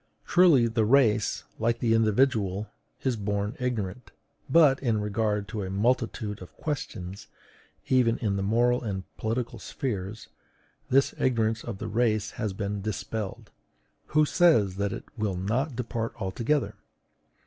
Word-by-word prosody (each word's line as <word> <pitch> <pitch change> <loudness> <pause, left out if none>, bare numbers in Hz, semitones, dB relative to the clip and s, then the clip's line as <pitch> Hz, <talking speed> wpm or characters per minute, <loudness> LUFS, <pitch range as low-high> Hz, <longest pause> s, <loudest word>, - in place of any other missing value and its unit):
Truly, 170 -9 +5
the 115 -1 +1
race, 110 -3 +3 0.2
like 115 +1 +1
the 115 -2 +1
individual, 110 -3 +2 0.3
is 130 -3 +1
born 105 +1 -2
ignorant; 125 -3 -3 0.4
but, 140 -2 +6
in 115 -5 +1
regard 105 0 -1
to 110 -3 -4
a 95 - -4
multitude 110 0 0
of 90 - -12
questions, 100 - -5 0.6
even 125 -3 +3
in 105 -3 -1
the 100 - -1
moral 120 +5 +2
and 100 -5 -3
political 115 +1 -2
spheres, 105 -5 -4 0.6
this 135 +2 +3
ignorance 115 -3 +1
of 115 -5 -5
the - - -5
race 110 -2 +1
has 110 -3 -3
been 100 +1 -3
dispelled: 105 0 -4 0.6
who 155 0 +3
says 140 - +3
that 100 0 0
it - - -5 0.2
will 100 -4 -1
not 120 - -1
depart 115 -1 -3
altogether? 115 +4 0
110 Hz, 135 wpm, -27 LUFS, 100-125 Hz, 0.6 s, but